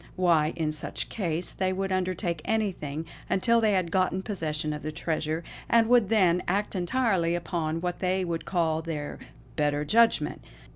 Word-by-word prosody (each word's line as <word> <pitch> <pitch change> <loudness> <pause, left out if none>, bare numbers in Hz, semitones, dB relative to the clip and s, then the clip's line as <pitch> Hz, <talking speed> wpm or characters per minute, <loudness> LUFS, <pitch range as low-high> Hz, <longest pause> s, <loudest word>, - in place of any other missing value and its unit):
Why, 165 -4 +3
in 160 -2 -1
such 150 0 -4
case, 175 -4 -2
they 185 0 -1
would 195 +1 -2
undertake 185 -3 -1
anything, 175 -9 -2 0.2
until 230 +5 +3
they 215 -2 +3
had 180 -3 0
got 185 +1 +1
possession 155 -7 -2
of 150 - -6
the 155 - -4
treasure; 160 0 -2 0.3
and 230 -1 +5
would 240 -5 +5
then 180 -5 +4
act 200 +3 0
entirely 185 -3 +1
upon 165 -1 -2
what 175 0 -2
they 185 0 0
would 170 -1 -3
call 160 -3 0
their 155 -3 -5 0.4
'better 145 -1 +1
judgment.'" 230 +7 +3
175 Hz, 160 wpm, -27 LUFS, 160-195 Hz, 0.4 s, and